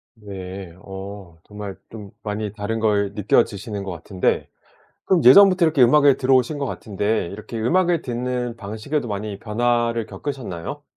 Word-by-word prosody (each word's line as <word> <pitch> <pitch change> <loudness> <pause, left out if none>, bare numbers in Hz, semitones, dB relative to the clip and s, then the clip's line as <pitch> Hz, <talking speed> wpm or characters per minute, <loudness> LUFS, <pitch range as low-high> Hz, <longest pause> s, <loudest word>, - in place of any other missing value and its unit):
네. 95 -4 -8
어. 95 -3 -9
정말 105 -2 -8
좀 105 -3 -10
많이 105 -1 -3
다른 110 +1 -3
걸 100 -2 +1
느껴지시는 105 +1 0
것 100 - -5
같은데. 90 +3 -1 0.6
그럼 180 -7 +2
예전부터 185 +6 +8
이렇게 155 -5 +3
음악을 140 +2 +5
들어오신 130 +2 +2
것 140 - -2
같은데 105 -4 -2
이렇게 110 +4 -7
음악을 170 +8 +2
듣는 125 -1 -3
방식에도 110 +7 -3
많이 105 -1 -4
변화를 115 +1 0
겪으셨나요? 130 - -6
110 Hz, 335 characters per minute, -22 LUFS, 100-125 Hz, 0.6 s, 예전부터